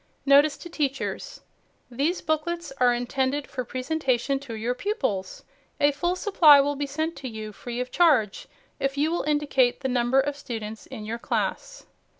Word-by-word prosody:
NOTICE 280 +1 +5
TO - - -9
TEACHERS 280 -5 -3 0.5
These 290 +9 0
booklets 315 0 -2
are 250 -1 +5
intended 260 +3 -1
for 255 - -5
presentation 260 0 -1
to 265 -5 -8
your 230 +3 -1
pupils. 250 - -3 0.4
A 290 - +4
full 345 +6 -1
supply 335 -7 +6
will 285 +1 +1
be 285 0 -3
sent 315 +4 -2
to 265 - -6
you, 215 -1 -7
free 240 +3 -6
of 250 0 -4
charge, 280 - +2 0.3
if 275 +1 -1
you 305 +3 +1
will 345 - 0
indicate 290 -4 +1
the 265 - -1
number 250 +1 +2
of 285 +1 0
students 225 -6 -7
in 220 -5 -8
your 230 +2 -4
class. - - -3
275 Hz, 165 wpm, -25 LUFS, 245-300 Hz, 0.5 s, supply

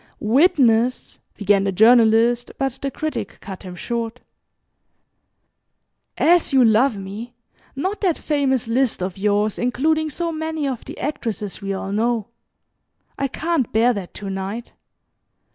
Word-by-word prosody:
"Witness 250 -2 +2
" - - -42
began 200 -1 +2
the 195 - 0
Journalist, 230 +3 +4
but 270 -2 -2
the 275 - -1
Critic 310 +3 -4
cut 190 -2 -9
him 180 -2 -8
short. 235 +4 -4 2.0
"As 345 -1 +4
you 265 -3 +5
love 225 +2 +3
me 205 +5 -8 0.4
not 375 +10 -3
that 365 -6 +1
famous 270 -6 0
list 240 -4 0
of 185 -1 -3
yours 205 +1 0
including 310 +6 +1
so 335 +3 -2
many 315 -2 -3
of 255 -4 -4
the - - -9
actresses 220 -8 -4
we 195 0 -3
all 195 0 -4
know. 225 +1 0 0.9
I 275 - +1
can't 315 -1 -1
bear 235 +3 +3
THAT 195 -5 -6
to 200 -1 -6
night. 195 +5 -5
235 Hz, 140 wpm, -21 LUFS, 210-275 Hz, 2.0 s, you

